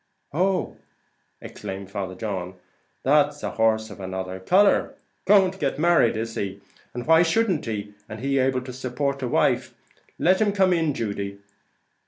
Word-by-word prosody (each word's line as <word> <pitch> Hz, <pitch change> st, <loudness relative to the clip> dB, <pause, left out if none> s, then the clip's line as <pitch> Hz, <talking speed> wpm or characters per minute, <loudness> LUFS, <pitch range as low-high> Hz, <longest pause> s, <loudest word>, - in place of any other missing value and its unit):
"Oh," 185 Hz, +4 st, 0 dB, 0.6 s
exclaimed 95 Hz, 0 st, -8 dB
Father 95 Hz, -2 st, -4 dB
John, 95 Hz, -3 st, -4 dB, 0.5 s
"that's -, -, +2 dB
a -, -, -2 dB
horse 110 Hz, -1 st, +1 dB
of 105 Hz, -, -11 dB
another 95 Hz, 0 st, -5 dB
colour; 195 Hz, -, +3 dB, 0.3 s
going 195 Hz, -2 st, +6 dB
to 190 Hz, -, -14 dB
get 140 Hz, -2 st, -1 dB
married, 155 Hz, -8 st, +3 dB
is 115 Hz, +1 st, -3 dB
he? 100 Hz, -2 st, -4 dB, 0.4 s
and 120 Hz, -, -4 dB
why 165 Hz, +1 st, +6 dB
shouldn't 175 Hz, -, +1 dB
he, 105 Hz, -2 st, -4 dB, 0.2 s
and 110 Hz, -, -7 dB
he 135 Hz, +2 st, 0 dB
able 130 Hz, 0 st, +1 dB
to 125 Hz, 0 st, -8 dB
support 135 Hz, +2 st, -3 dB
a 130 Hz, -, -1 dB
wife? -, -, +1 dB, 0.4 s
let 185 Hz, +4 st, +3 dB
him 205 Hz, -2 st, +2 dB
come 190 Hz, -2 st, +3 dB
in, 160 Hz, -4 st, 0 dB
Judy." 100 Hz, -3 st, -4 dB
125 Hz, 160 wpm, -24 LUFS, 100-170 Hz, 0.6 s, going